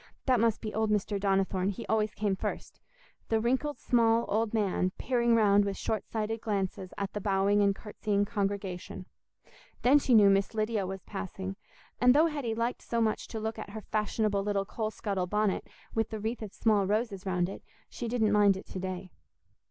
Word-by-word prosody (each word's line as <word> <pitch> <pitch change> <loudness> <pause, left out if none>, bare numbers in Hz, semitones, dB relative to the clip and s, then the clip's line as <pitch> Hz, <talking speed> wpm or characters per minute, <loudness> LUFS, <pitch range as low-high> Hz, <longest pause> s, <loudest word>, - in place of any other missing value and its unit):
That 255 -3 +3
must 230 -1 +2
be 215 -2 -5
old 220 0 0
Mr. 205 -1 0
Donnithorne—he 195 +1 0
always 215 -1 0
came 205 -2 0
first, - - -5 0.5
the 225 - +2
wrinkled 260 +6 0
small 230 -1 +3
old 215 +1 +1
man, 195 -4 +1
peering 240 -2 +2
round 205 -2 +5
with 200 -1 -3
short 215 -2 -2
sighted 220 0 -3
glances 195 -3 -2
at 200 -1 -3
the 210 - -3
bowing 200 +1 +2
and 200 -1 +3
curtsying 205 -1 -1
congregation; 195 -4 -3 0.8
then 275 +4 +6
she 255 -3 +3
knew 205 -2 +7
Miss 195 +3 +1
Lydia 215 -3 0
was 190 -1 -6
passing, 195 -1 -5 0.4
and 250 +1 +6
though 310 +3 +6
Hetty 285 -8 -2
liked 235 +2 -1
so 235 - -2
much 220 -2 0
to 225 - -5
look 220 +1 -3
at - - -7
her 215 +2 -7
fashionable 210 -1 0
little 200 -1 0
coal 215 +1 -3
scuttle 200 -4 -2
bonnet, 210 0 0 0.3
with 225 -1 0
the 220 - -5
wreath 225 +3 -3
of 210 -3 -6
small 205 -3 +2
roses 205 -2 -1
round 180 -1 +1
it, 195 - -8 0.2
she 240 - -6
didn't 225 -2 +1
mind 205 -2 +5
it 190 - -9
to 185 - -5
day. 185 0 -5
210 Hz, 190 wpm, -30 LUFS, 195-225 Hz, 0.8 s, knew